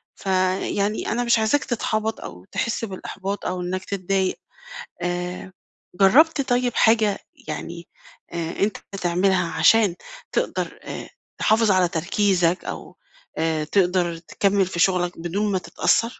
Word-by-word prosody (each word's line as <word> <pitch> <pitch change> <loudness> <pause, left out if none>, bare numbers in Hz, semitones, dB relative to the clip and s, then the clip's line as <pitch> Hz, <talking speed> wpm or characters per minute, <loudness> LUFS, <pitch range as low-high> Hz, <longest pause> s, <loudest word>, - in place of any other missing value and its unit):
فيعني 190 +2 0
أنا 240 +2 0
مش 235 -1 +3
عايزاك 220 +6 +2
تتحبَط 220 -2 -1
أو 90 +1 -9
تحس 230 0 -1
بالإحباط 195 0 -5
أو 180 0 -2
إنَّك 185 +1 -3
تتضايق. 195 -1 -1 0.6
آآ، 180 +1 -3 0.4
جرّبت 280 - +5
طيب 245 -1 +2
حاجة 220 -2 +3 0.3
يعني - - -6 0.5
آآ، 165 -1 -4
أنت 205 +1 +1 0.2
بتعملها 180 0 +1
علشان 215 -6 +4 0.4
تقدر - - -2
آآ، - - -7 0.3
تحافظ 220 -1 +3
على 185 -2 +4
تركيزَك 180 +1 +1
أو - - -7 0.4
آآ، 160 -1 0
تقدر 175 0 +1
تكمّل 195 +3 +1
في 175 -1 -5
شُغلَك 180 -1 +2
بدون 200 +5 -1
ما 190 - +1
تتأثر؟ 230 - +1
190 Hz, 125 wpm, -23 LUFS, 180-215 Hz, 0.6 s, جرّبت